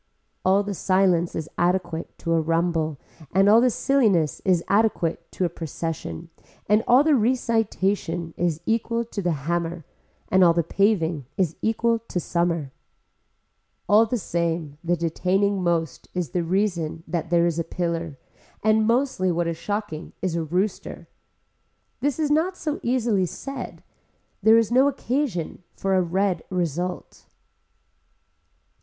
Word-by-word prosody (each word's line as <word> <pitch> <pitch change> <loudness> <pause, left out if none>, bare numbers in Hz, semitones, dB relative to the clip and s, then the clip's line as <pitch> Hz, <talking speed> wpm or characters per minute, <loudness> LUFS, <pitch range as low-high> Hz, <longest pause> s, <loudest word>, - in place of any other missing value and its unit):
All 195 +2 +3
the 205 0 -4
silence 185 -2 +2
is 160 - -3
adequate 175 -2 -1
to 165 - -1
a 165 - +3
rumble 165 -2 0 0.4
and 195 +1 +5
all 220 +3 +7
the 255 - +4
silliness 215 - +2
is 180 -3 +2
adequate 195 -6 +1
to 185 - 0
a - - +3
procession 165 - -5 0.3
and 210 +2 +3
all 255 +4 +6
the 310 0 +3
recitation 210 - 0
is 165 -2 -1
equal 230 +1 0
to 225 -3 -5
the 160 -6 -2
hammer 170 -1 -2 0.4
and 190 0 +5
all 170 -1 +6
the 170 0 +1
paving 165 - +1
is 175 -4 0
equal 230 +1 +1
to 225 -5 -4
summer. 170 -5 -1 1.2
All 220 +2 +5
the 245 - -1
same 165 -6 -2
the 175 +1 +1
detaining 185 +4 0
most 170 -4 -1
is 175 -8 -2
the 175 - 0
reason 170 -3 -1
that 165 0 -3
there 170 -1 +3
is 170 -1 0
a - - +1
pillar 165 -3 -3 0.5
and 215 0 +3
mostly 235 -6 +1
what 170 0 0
is 165 0 -2
shocking 205 -6 -4
is 185 -3 -2
a 170 - 0
rooster. 180 +6 -2 0.9
This 285 0 0
is 305 -2 0
not 340 +5 +1
so 300 -1 -3
easily 235 -6 +1
said. 275 +7 -7 0.6
There 220 +3 +6
is 230 -1 +2
no 260 +3 +5
occasion 255 - -2
for 195 0 -1
a 185 - +4
red 180 0 0
result. 180 0 -3
180 Hz, 145 wpm, -24 LUFS, 165-220 Hz, 1.2 s, all